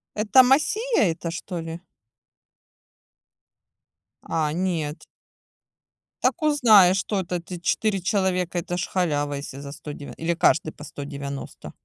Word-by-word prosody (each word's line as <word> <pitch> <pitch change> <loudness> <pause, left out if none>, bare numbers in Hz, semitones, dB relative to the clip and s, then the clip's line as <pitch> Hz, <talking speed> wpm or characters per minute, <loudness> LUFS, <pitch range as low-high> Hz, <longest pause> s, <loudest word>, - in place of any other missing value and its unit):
Это 220 +5 +5
Macia 415 - +2
эта 165 +1 -4
что 175 +1 -5
ли? 165 +1 -6 2.4
А, 155 -2 -1
нет. 165 -4 -2 1.2
Так 350 - +1
узнай, 220 -11 +6
что 195 +1 -1
это, 180 0 -3
ты 175 0 -8
4 195 +2 0
человека- 185 -2 0
это 175 +1 -4
ж 175 - -2
халява, 145 -6 0
если 140 -1 -7
за 140 0 -8
сто 150 0 -8
дев 145 - -9
или 165 +1 0
каждый 160 -2 +2
по 150 - -12
190? 140 -1 -7
175 Hz, 125 wpm, -24 LUFS, 150-195 Hz, 2.4 s, узнай